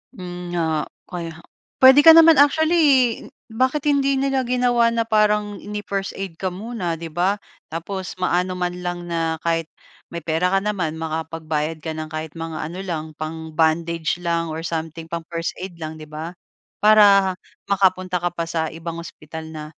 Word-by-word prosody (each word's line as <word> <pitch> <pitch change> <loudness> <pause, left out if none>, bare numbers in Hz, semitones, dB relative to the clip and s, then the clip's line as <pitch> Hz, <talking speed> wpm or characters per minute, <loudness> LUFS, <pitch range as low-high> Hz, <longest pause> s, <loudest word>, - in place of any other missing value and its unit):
Hmm, 180 -1 -7
nga. 160 -2 0 0.2
Kaya 165 -2 -6 0.4
puwede 265 +2 +9
ka 325 - +11
naman 330 -1 +8
actually, 290 -5 +4 0.3
bakit 260 +5 0
hindi 275 -1 +3
nila 270 -1 +1
ginawa 245 -1 +3
na 230 0 +1
parang 210 -1 +2
ini 210 0 -5
first 195 -1 -2
aid 190 -4 -5
ka 190 - -1
muna, 190 -3 -4
'di 165 - -5
ba? 185 +5 +1 0.4
Tapos 185 +3 -5
maano 180 0 0
man 180 0 -1
lang 175 0 -3
na 165 -1 -1
kahit 165 -1 0 0.4
may 170 - -4
pera 165 +3 +1
ka 195 - +3
naman, 180 -7 -1
makapagbayad 160 -1 -3
ka 160 - -3
ng 155 0 -5
kahit 155 -1 -5
mga 165 -1 -5
ano 180 - -7
lang, 165 -5 -3 0.2
pang-bandage 160 +1 -1
lang 170 -1 0
or 160 +1 -5
something 165 0 -4
pang-first 165 0 -3
aid 185 -1 -7
lang, 155 0 -5
'di 155 - -10
ba? 160 +3 -5 0.5
Para 200 -3 +6 0.4
makapunta 185 -2 +2
ka 175 - +1
pa 170 - -1
sa 160 -1 -1
ibang 165 +1 -6
ospital 160 0 -9
na 155 -1 -7
175 Hz, 165 wpm, -22 LUFS, 160-210 Hz, 0.5 s, ka